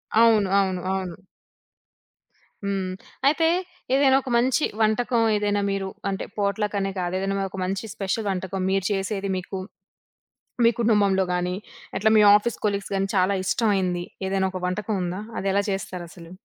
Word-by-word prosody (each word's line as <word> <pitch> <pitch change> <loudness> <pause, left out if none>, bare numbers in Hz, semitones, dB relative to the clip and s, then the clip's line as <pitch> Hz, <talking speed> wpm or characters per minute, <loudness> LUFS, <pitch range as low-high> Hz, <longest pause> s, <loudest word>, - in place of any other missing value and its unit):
అవును. 220 -3 +5
అవును. 190 -2 0
అవును. 185 -2 -4 1.4
హ్మ్. 195 -2 -1 0.4
అయితే 320 +3 +3 0.5
ఏదైనా 270 -1 +5
ఒక 265 - -7
మంచి 260 +5 +2 0.2
వంటకం 230 +2 +2
ఏదైనా 205 0 0
మీరు 195 -1 -2 0.2
అంటే, 195 - -3
పాట్‌లకనే 200 -1 0
కాదు. 175 0 -2
ఏదైనా 195 0 -1
ఒక 195 - -8
మంచి 195 +3 -3
స్పెషల్ 205 +2 -2
వంటకం, 190 0 -3
మీరు 195 -1 +1
చేసేది 195 0 -2
మీకు 185 +1 -5 1.1
మీ 230 - +7
కుటుంబంలో 205 -4 +3
గాని, 180 0 -1 0.4
అట్లా 205 +3 +3
మీ - - +7
ఆఫీస్ 215 +2 +1
కొలీగ్స్ 200 -1 -1
గాని 195 0 0
చాలా 185 +1 +3
ఇష్టమైయింది. 190 -4 +1 0.2
ఏదైనా 190 0 +1
ఒక 185 - -5
వంటకం 210 +4 -2
ఉందా? 180 +3 -3 0.2
అది 195 - -1
ఎలా 200 - +3
చేస్తారసలు? 175 -3 -6
195 Hz, 140 wpm, -24 LUFS, 190-210 Hz, 1.4 s, మీ